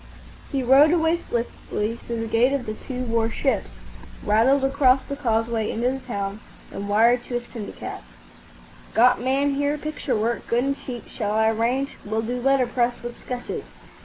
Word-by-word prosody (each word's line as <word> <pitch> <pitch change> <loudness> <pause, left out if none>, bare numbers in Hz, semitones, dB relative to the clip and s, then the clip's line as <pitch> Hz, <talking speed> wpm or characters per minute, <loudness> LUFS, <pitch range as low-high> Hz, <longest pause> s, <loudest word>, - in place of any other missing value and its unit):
He 270 -2 0
rode 270 +5 +7
away 330 0 +3
swiftly 230 -4 -3
through 235 -1 -5
the - - -2
Gate 235 +4 +3
of 275 -3 -1
the 215 - -3
Two 255 +3 -5
War 230 -2 +1
Ships, 265 +3 -1 0.6
rattled 235 +6 +4
across 270 -1 +4
the 280 - -5
causeway 225 -4 0
into 240 +3 0
the 265 - -4
town, 200 -5 -4 0.3
and 200 +1 -5
wired 235 +4 +4
to 245 - -4
his 240 0 -2
syndicate, 225 -4 -7 0.9
"Got 245 +2 +5
man 275 +3 +1
here, 285 +1 0
picture 300 -4 -3
work. 230 +2 -1
Good 240 +1 +2
and 275 +1 0
cheap. 245 -4 -8
Shall 210 -3 -3
I 220 +1 +3
arrange? 245 +5 -1
Will 220 +2 -2
do 245 +2 -3
letterpress 245 -2 +1
with 240 0 -7
sketches." 250 -1 -5
245 Hz, 170 wpm, -24 LUFS, 225-270 Hz, 0.9 s, rode